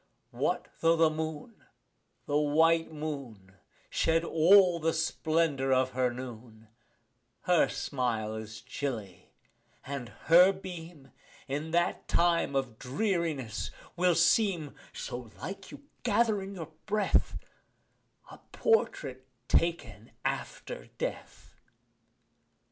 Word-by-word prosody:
What - - -1
tho' 165 0 +4
the 160 -1 +4
moon 155 +6 -5 0.6
the 145 - -2
white 160 +3 +3
moon 140 -11 -6 0.4
Shed 165 0 +2
all 175 +2 +5
the 165 0 +1
splendour 160 -4 0
of 130 0 +3
her 125 -1 +1
noon, 115 -3 -9 0.7
Her 180 -2 +3
smile 115 -5 -2
is 110 0 -7
chilly, 115 -6 -6 0.5
and 135 -4 -5 0.2
her 175 +4 +8
beam, 175 -6 -9 0.4
In 145 +4 -3
that 175 +1 0
time 170 -4 +2
of 130 -5 -2
dreariness, 155 - -1 0.3
will 180 -1 +3
seem 170 -3 +3 0.2
(So 120 -2 -6
like 195 +2 -7
you - - -11 0.2
gather 220 -4 +2
in 195 +1 -7
your 165 -3 -7 0.2
breath) 210 -1 +1 0.9
A - - -12
portrait 135 - 0 0.2
taken 120 - 0
after - - -4
death. - - -6
155 Hz, 105 wpm, -30 LUFS, 130-170 Hz, 0.9 s, her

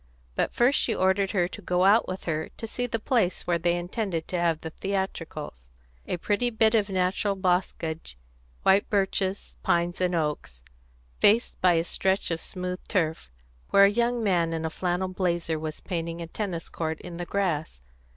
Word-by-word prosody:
But - - 0
first 250 +4 +3
she - - +1
ordered 190 +1 +2
her 180 -4 +1
to 205 - -9
go 180 -1 +1
out 210 +4 +5
with 185 +1 -5
her 160 -2 -2
to - - -5
see 245 +2 -3
the 230 - -1
place 220 -5 0
where 170 -1 +1
they 175 +1 +2
intended 175 -1 -3
to 180 - -1
have 165 -2 +1
the 160 - -6
theatricals: 165 - -4 0.4
a - - -1
pretty 210 +7 +1
bit 220 -1 +3
of 215 -3 +2
natural 190 +2 0
boscage 175 - -1 0.5
white 195 +1 +4
birches, 195 -1 0
pines, 175 +1 +1
and 180 -1 +2
oaks 150 - -3 0.6
faced 225 +3 +4
by 180 -1 +5
a 165 0 +2
stretch 190 +1 0
of 165 -1 -2
smooth 180 0 -5
turf, 160 - -1 0.4
where 200 - +6
a 200 - +8
young 235 +1 +1
man 170 -5 +2
in 160 0 -2
a 160 - -2
flannel 180 +3 -1
blazer 175 -3 -1
was 155 0 -5
painting 170 -2 -3
a 170 - -4
tennis 170 -1 -4
court 160 -1 -3
in 175 -2 -8
the 175 - -4
grass. 160 - -1
180 Hz, 180 wpm, -27 LUFS, 165-200 Hz, 0.6 s, a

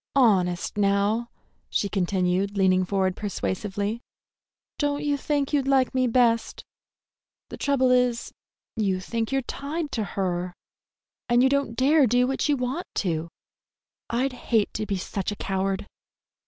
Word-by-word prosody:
Honest, 195 -7 +2
now," 205 +4 +1 0.4
she 205 - 0
continued, 190 +1 0
leaning 185 -1 +4
forward 190 -1 0
persuasively, 205 +2 -3 0.8
"don't 290 0 0
you 290 -1 +1
think 285 0 -1
you'd 275 -2 +2
like 265 -2 +3
me 255 -1 +2
best? 230 -1 +1 0.8
The - - -7
trouble 260 -3 +2
is, 250 -2 +1 0.4
you 195 -4 0
think 225 +4 -3
you're 270 -1 +1
tied 295 +4 -4
to 220 - -1
her, 180 -2 -2 0.7
and 240 +1 +5
you 265 - +5
don't 280 -4 0
dare 280 +2 +4
do 245 +2 +3
what 270 +3 -1
you 290 - +3
want 255 +8 -3
to. 165 -3 -1 0.8
I'd 255 +3 0
hate 230 -3 0
to 215 0 -3
be 200 - -1
such 190 +2 -3
a - - -4
coward!" 195 0 -2
225 Hz, 140 wpm, -25 LUFS, 195-260 Hz, 0.8 s, and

